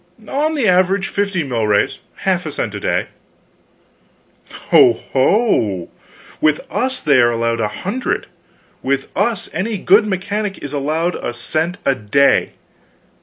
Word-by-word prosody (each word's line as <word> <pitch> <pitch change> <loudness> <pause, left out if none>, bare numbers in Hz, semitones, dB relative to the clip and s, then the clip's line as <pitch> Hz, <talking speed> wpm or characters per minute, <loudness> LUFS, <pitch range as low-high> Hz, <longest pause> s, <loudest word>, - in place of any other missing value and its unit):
"On 305 +6 0
the 265 -7 +1
average, 185 +1 +2
fifty 200 -4 -1
milrays; 110 -6 0 0.3
half - - +1
a - - -4
cent - - -3
a - - -5
day." - - 0 1.6
"Ho 120 - +7
ho! 130 - +1 0.5
With 155 -1 +2
us 260 +1 -1
they 140 -3 +4
are 120 - +4
allowed 115 0 -1
a 105 - +1
hundred! 195 - -3 0.6
With 135 0 -1
us 230 -5 0
any 205 +6 -2
good 210 - +4
mechanic 200 +1 -2
is 145 0 -8
allowed 155 +5 -1
a 120 - -4
cent 160 +8 -2
a 140 - +4
day! 130 +4 +2
160 Hz, 135 wpm, -18 LUFS, 125-205 Hz, 1.6 s, Ho